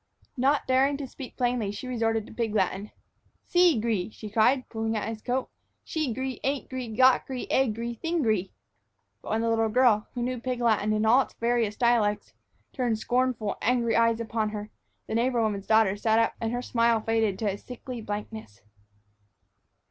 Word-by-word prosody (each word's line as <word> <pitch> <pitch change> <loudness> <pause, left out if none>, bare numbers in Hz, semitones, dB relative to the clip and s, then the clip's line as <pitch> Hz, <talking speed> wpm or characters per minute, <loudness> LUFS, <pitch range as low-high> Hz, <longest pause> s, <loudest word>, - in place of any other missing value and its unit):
Not 275 +2 +2
daring 270 +2 +2
to 285 - -5
speak 255 0 -10
plainly, 245 -5 0
she 230 +5 -7
resorted 225 -3 0
to - - -13
pig 225 -2 -2
Latin. 195 +1 0 0.6
"Seegry," 230 - +2
she 215 -1 -9
cried, 250 +5 +3
pulling 225 -1 -2
at 210 - -3
his 225 -1 -5
coat, 255 +2 -1 0.4
"shegry 265 -4 -3
ain'tgry 260 -4 -3
gotgry 260 0 +3
agry 235 -2 0
thinggry." 225 - 0 0.7
But - - -9
when 220 +1 0
the 230 - 0
little 225 -1 +2
girl, 230 -2 +3
who 240 - -2
knew 250 0 -2
pig 250 0 -3
Latin 215 -3 +2
in 215 0 +1
all 240 +5 +6
its - - -7
various 230 -3 0
dialects, 220 -4 +1 0.4
turned 245 -4 0
angry, - - -1
scornful 240 -3 0
eyes 230 -1 +2
upon 225 -1 -1
her, 210 0 -6 0.3
the - - -5
neighbor 240 +2 +1
woman's 210 -3 -1
daughter 220 -3 +4
sat 220 +2 +1
up 230 0 +2
and 225 -1 -1
her 245 +1 -3
smile 230 -2 +2
faded 220 -3 0
to 210 -3 0
a - - -4
sickly 250 +2 -8
blankness. 210 - -7
230 Hz, 170 wpm, -27 LUFS, 215-250 Hz, 0.7 s, all